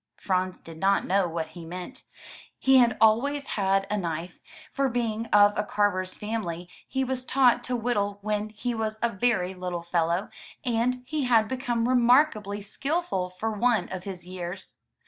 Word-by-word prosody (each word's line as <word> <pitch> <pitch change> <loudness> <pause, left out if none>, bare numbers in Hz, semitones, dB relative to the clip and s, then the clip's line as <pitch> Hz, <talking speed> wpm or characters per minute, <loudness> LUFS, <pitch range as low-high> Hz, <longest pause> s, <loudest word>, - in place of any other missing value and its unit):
Franz 185 -1 -1
did 165 -1 -11
not 195 +2 +2
know 190 -1 +2
what 165 -1 -4
he 175 - -10
meant. 180 +10 -8 0.5
He 265 0 +5
had 235 -2 +3
always 270 +6 +3
had 195 -1 +1
a 210 - -1
knife, 170 0 -4 0.3
for 275 -2 +1
being 230 -2 -2
of 205 -1 +6
a 210 - 0
carver's 200 -3 0
family 205 -6 -4 0.2
he 265 0 -1
was 260 -1 -1
taught 255 -1 +3
to 250 - -1
whittle 205 -4 -1
when 210 0 -1
he 230 +3 -3
was 220 -1 -2
a 235 - +3
very 190 -3 0
little 180 -2 -4
fellow, 170 +2 0 0.4
and 250 +1 0
he 290 +1 -2
had 225 -3 +4
become 245 -2 -1
remarkably 245 -5 +3
skillful 275 - -2
for 185 +5 -3
one 220 -3 +1
of 185 -1 -6
his 185 -3 -6
years. 180 +1 -6
210 Hz, 165 wpm, -27 LUFS, 185-245 Hz, 0.5 s, of